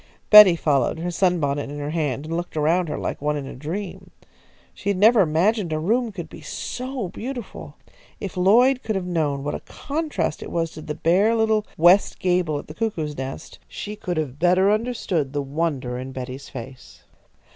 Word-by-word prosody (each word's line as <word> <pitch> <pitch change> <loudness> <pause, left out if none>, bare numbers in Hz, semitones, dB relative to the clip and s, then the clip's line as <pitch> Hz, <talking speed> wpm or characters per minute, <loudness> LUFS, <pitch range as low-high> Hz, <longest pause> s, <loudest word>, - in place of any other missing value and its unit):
Betty 210 -4 +10
followed, 145 -4 +1
her 175 +2 -3
sunbonnet 160 -7 0
in 145 - -6
her 145 0 -4
hand, 150 -4 -2
and 165 +1 -4
looked 175 -1 -4
around 165 +3 +2
her - - -3
like - - -4
one 150 0 0
in 140 - -5
a - - -8
dream. 175 +9 -6 0.6
She 200 - -4
had 200 - +1
never 220 +3 +6
imagined 180 +3 +1
a 155 - 0
room 225 +9 0
could 175 -5 -7
be - - -12
so 255 -5 -5
beautiful. 245 +3 -7 0.4
If 195 -2 -6
Lloyd 240 +8 +4
could 220 - -3
have 190 -2 -2
known 150 -6 -1
what 145 - -2
a - - -3
contrast 285 - -3
it - - -7
was 165 -1 -1
to 155 - -10
the 150 -1 -5
bare 195 +7 +3
little 220 -1 +1
west 175 +5 +5
gable 180 -4 +1
at - - -7
the 155 - -10
cuckoo's 160 -8 -3
nest, 135 0 -7
she 210 0 -6
could 180 -5 -4
have 145 -3 -3
better 185 +3 +4
understood 210 - -1
the 145 -1 -1
wonder 140 -4 -2
in 130 +1 -7
Betty's 130 +1 -7
face. 130 +1 -10
170 Hz, 190 wpm, -23 LUFS, 150-205 Hz, 0.6 s, Betty